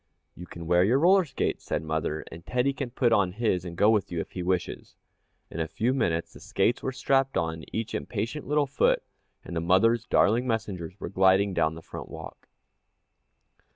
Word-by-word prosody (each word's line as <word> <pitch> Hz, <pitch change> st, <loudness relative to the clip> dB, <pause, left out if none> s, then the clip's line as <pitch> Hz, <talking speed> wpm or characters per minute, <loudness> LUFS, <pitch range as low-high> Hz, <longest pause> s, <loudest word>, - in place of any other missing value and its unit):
"You 90 Hz, -, -10 dB
can 85 Hz, -1 st, -9 dB
wear 90 Hz, +2 st, +4 dB
your 115 Hz, +7 st, +3 dB
roller 185 Hz, +5 st, +5 dB
skates," 140 Hz, -, -2 dB
said -, -, -2 dB
mother, 80 Hz, 0 st, -2 dB
"and 85 Hz, 0 st, -10 dB
Teddy 125 Hz, +6 st, 0 dB
can 135 Hz, -1 st, -4 dB
put 120 Hz, -1 st, +2 dB
on 95 Hz, -5 st, +2 dB
his 105 Hz, -5 st, 0 dB
and 85 Hz, -2 st, -8 dB
go 105 Hz, +4 st, +5 dB
with 105 Hz, -5 st, 0 dB
you, 85 Hz, -, -2 dB
if -, -, -5 dB
he 90 Hz, -, -5 dB
wishes." 90 Hz, 0 st, -2 dB, 0.6 s
In 85 Hz, -, -6 dB
a 80 Hz, -, -1 dB
few 115 Hz, +10 st, 0 dB
minutes 85 Hz, -10 st, -1 dB
the -, -, -13 dB
skates 120 Hz, -, 0 dB
were 130 Hz, -, -2 dB
strapped 135 Hz, +1 st, +1 dB
on 80 Hz, -1 st, -2 dB
each 110 Hz, 0 st, -3 dB
impatient 115 Hz, +7 st, -4 dB
little 150 Hz, 0 st, +2 dB
foot, 140 Hz, 0 st, +1 dB, 0.4 s
and 85 Hz, -1 st, -3 dB
mother's 115 Hz, +7 st, +3 dB
darling 115 Hz, +5 st, +3 dB
messengers 100 Hz, -6 st, -3 dB
were -, -, -5 dB
gliding 95 Hz, +1 st, +3 dB
down 80 Hz, -2 st, +1 dB
the 80 Hz, -, -10 dB
front -, -, -8 dB
walk. -, -, -10 dB
100 Hz, 190 wpm, -27 LUFS, 85-125 Hz, 0.6 s, roller